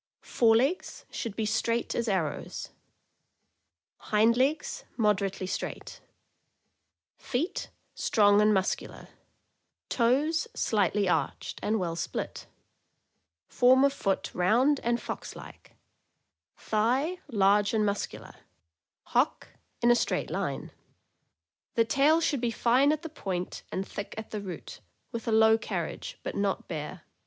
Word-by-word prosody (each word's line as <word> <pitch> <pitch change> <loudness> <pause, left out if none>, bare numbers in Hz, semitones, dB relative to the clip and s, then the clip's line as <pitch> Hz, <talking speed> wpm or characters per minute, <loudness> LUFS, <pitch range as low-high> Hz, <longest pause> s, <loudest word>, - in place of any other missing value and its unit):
Fore 225 -2 +3
legs 275 +10 0
should 225 -4 -4
be 220 - -1
straight 230 +2 0
as 235 0 -1
arrows; 185 -7 -2 1.3
hind 220 +2 +3
legs 285 - 0
moderately 200 -4 +1
straight; 185 - -5 1.2
feet 295 +10 -2 0.2
strong 205 -1 +4
and 210 0 +5
muscular; 190 -2 -1 0.8
toes 285 - +2
slightly 205 -1 +1
arched 180 - -1
and 220 +1 0
well 170 -3 -2
split; 165 - -4 1.0
form 260 +2 +5
of 280 0 +4
foot 195 -7 -1
round 245 +11 +3
and 235 0 0
fox - - -6
like; - - -13 0.8
thigh 255 +11 0
large 200 -1 +3
and 215 -2 +2
muscular; 200 0 -3 0.8
Ttock - - +1 0.3
in 240 - +6
a - - +6
straight - - -1
line. - - -3 1.0
The 230 -2 +4
tail 290 +7 +4
should 285 -6 0
be 240 - +1
fine 250 +5 +3
at 305 +1 -2
the - - -4
point 185 - -4
and 190 +1 -3
thick 200 - -6
at 220 - -7
the 210 - -3
root, 190 -3 -8 0.3
with 230 -2 -6
a - - +1
low 220 0 +5
carriage, - - -4
but - - -4
not 200 -1 -1
bare. 155 +1 -6
225 Hz, 125 wpm, -28 LUFS, 200-255 Hz, 1.3 s, in